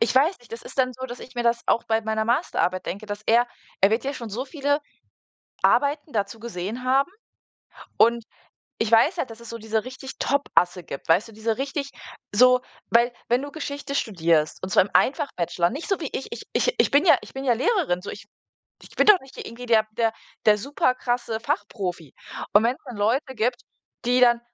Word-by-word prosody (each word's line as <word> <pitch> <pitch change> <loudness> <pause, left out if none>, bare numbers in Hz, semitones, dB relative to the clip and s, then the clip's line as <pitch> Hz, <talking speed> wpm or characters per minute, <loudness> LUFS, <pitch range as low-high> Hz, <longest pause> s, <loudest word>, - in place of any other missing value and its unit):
ich 230 +2 +2
weiß 305 +8 +3
nicht, 240 -1 -19
das 230 - -7
ist - - -11
dann 255 -1 +3
so, 260 - -7
dass 245 0 -8
ich 255 - -12
mir 240 - -1
das 235 0 +1
auch 230 - +2
bei 220 0 +1
meiner 220 0 -1
Masterarbeit 225 - 0
denke, 205 +4 -5
dass 205 0 -5
er 240 +2 +4 0.3
er 195 - +5
wird 225 +4 0
ja 275 +1 -2
schon 235 -4 -7
so 240 +6 -3
viele 285 +1 -1 0.8
Arbeiten 290 +1 +2
dazu 220 +1 -2
gesehen 220 +1 -5
haben 270 +6 +2 0.9
und 235 0 +4 0.6
ich 225 - +1
weiß 230 +11 +5
ja, 335 - 0
dass 225 -2 -12
es 235 - -11
so 230 - -5
diese 220 0 -1
richtig 260 +1 -8
Topasse 180 -10 +1
gibt, 140 - -8
weißt 175 +7 +4
du, - - -13
diese 220 +1 -2
richtig 275 +1 -3 0.4
so, 250 +3 +6 0.3
weil 240 +1 +4
wenn 245 +2 +2
du 285 - -7
Geschichte 285 -2 -5
studierst 165 - +1
und 185 - -3
zwar 210 - +5
im 195 - -9
Ein-Fach-Bachelor, 175 - +1
nicht 290 +5 -6
so 390 -3 +1
wie 305 - -4
ich, 270 - -5
ich - - -6
ich - - +2
ich - - +4
bin 290 +6 +4
ja - - +7
ich - - -13
bin 270 - -5
ja 255 -3 +3
Lehrerin, 275 - +1
so, 205 - -7
ich 200 - -8 0.6
ich - - -16
bin - - +3
doch 420 -3 +8
nicht 265 0 -16
hier - - -7
irgendwie 245 +2 -8
der 220 -2 +4
der 225 0 +1 0.3
der 210 -1 +6
super 255 +2 0
krasse 240 -3 -2
Fachprofi. 195 - -3 0.4
Und 205 +2 +6
wenn's 245 +3 0
dann 245 -3 -8
Leute 255 +7 0
gibt, 240 +3 0 0.4
die 245 +1 +3
dann 240 -1 +5
240 Hz, 215 wpm, -24 LUFS, 215-270 Hz, 0.9 s, doch